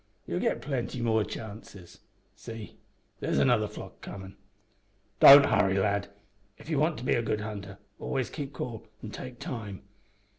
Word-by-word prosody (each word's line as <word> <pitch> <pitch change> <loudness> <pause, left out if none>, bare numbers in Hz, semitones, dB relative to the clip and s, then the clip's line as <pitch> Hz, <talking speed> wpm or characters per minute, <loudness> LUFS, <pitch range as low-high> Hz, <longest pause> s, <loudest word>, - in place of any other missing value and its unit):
You'll - - -2
git - - 0
plenty 130 -3 -3
more 110 -2 +2
chances. 105 -4 -9 0.4
See, 110 +1 -9 0.4
there's - - -1
another 120 -5 +3
flock - - -10
comin'. 95 0 -9 0.8
Don't 140 0 +11
hurry, 100 -5 +3
lad. 100 +1 +1 0.5
If 160 - -9
ye - - +2
want 155 +2 +2
to 120 - -7
be - - +3
a 120 - +2
good 110 -2 -1
hunter 100 -2 -6 0.2
always 130 -3 -2
keep 145 -3 -5
cool, 115 -6 -6 0.2
an' 105 - -6
take 125 +2 -8
time. 110 - -6
110 Hz, 155 wpm, -29 LUFS, 100-125 Hz, 0.8 s, Don't